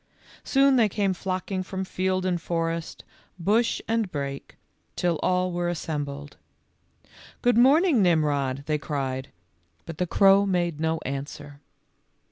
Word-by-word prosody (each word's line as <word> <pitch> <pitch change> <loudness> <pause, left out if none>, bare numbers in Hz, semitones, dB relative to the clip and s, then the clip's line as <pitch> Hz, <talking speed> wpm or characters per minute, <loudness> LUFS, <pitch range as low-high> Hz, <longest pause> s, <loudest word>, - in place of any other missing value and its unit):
Soon 275 -1 +4
they 225 -3 +4
came 200 -1 0
flocking 185 +1 -3
from 190 0 -5
field 185 0 -1
and 175 -2 0
forest, 165 0 -3 0.3
bush 215 +7 +1
and 225 -4 0
brake, 140 -1 -5 0.4
till 175 -3 0
all 185 0 +1
were 175 0 -1
assembled. 145 -4 -5 0.5
" - - -23
Good 245 -2 +4
morning, 275 - +5
Nimrod," 145 -6 +1
they 150 0 0
cried, 135 -3 -3 0.6
but 165 -2 -8
the 180 - 0
crow 195 +2 +5
made 175 -4 0
no 160 0 0
answer. 140 +1 -6
175 Hz, 130 wpm, -25 LUFS, 150-195 Hz, 0.6 s, morning